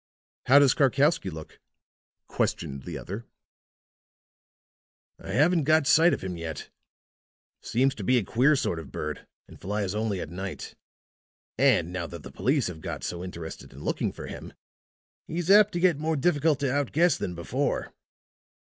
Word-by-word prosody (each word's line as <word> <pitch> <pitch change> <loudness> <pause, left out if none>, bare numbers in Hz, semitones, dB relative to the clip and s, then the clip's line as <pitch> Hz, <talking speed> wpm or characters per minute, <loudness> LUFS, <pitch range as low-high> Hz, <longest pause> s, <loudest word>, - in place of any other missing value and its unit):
"How 135 - +7
does 140 -2 +6
Karkowsky 140 - +2
look?" 80 -2 -10 0.7
questioned 70 -1 -2
the - - -5
other. 105 +5 -7 1.9
"I - - -11
haven't 160 +2 +3
got 155 0 +4
sight 165 +5 +5
of - - -2
him 90 -2 -4
yet. 85 -2 -6 0.9
Seems 135 +3 +1
to - - -8
be 130 0 +3
a 120 - +1
queer 130 +10 +3
sort 85 -10 -1
of 80 - -10
bird 75 -1 -5 0.2
and - - -15
flies 100 0 -2
only 105 -2 -1
at 75 - -6
night. 95 +1 -6 0.8
And 110 -10 +3
now 90 -2 -3
that 85 -2 -9
the 65 - -10
police 135 - +1
have 85 -3 -6
got - - -6
so 85 0 -4
interested 85 -3 -8
in - - -11
looking - - -1
for - - -9
him, - - -9 0.7
he's 170 +3 -1
apt 210 0 +7
to 175 - -1
get 175 -5 +3
more 160 +1 0
difficult 150 0 +2
to 135 -3 0
out 145 -2 -1
guess 170 +2 +4
than 90 - -4
before." 85 - -2
125 Hz, 165 wpm, -27 LUFS, -, 1.9 s, How